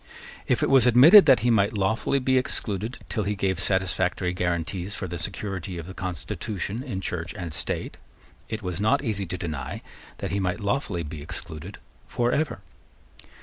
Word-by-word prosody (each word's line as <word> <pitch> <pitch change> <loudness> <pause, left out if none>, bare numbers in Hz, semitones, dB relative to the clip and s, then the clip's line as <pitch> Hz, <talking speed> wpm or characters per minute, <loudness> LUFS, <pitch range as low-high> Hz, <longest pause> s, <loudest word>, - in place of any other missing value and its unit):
If - - +2
it - - +2
was 130 -3 +6
admitted 150 - +9
that 135 -6 +6
he 120 +1 +3
might 105 -1 +2
lawfully 110 +7 +1
be 130 0 +3
excluded 110 -2 -1
till 110 - -1
he 105 +1 -1
gave 95 -3 -1
satisfactory 95 -1 +1
guarantees 90 +2 -2
for 95 - -4
the 85 -1 -5
security 95 0 -3
of 85 - -6
the 95 - -8
constitution 95 - -4
in 120 -9 -4
Church 90 -1 -4
and 85 -6 -6
State, - - -4 0.5
it 110 -2 -4
was 90 +1 -3
not 110 +6 +2
easy 100 -6 -2
to 90 - -4
deny 75 -7 -5 0.3
that - - -4
he 100 - 0
might 90 0 -1
lawfully 100 -4 -1
be 75 0 -7
excluded 85 +3 -7 0.3
for 120 0 0
ever. 155 -1 -1
95 Hz, 175 wpm, -25 LUFS, 90-110 Hz, 0.5 s, admitted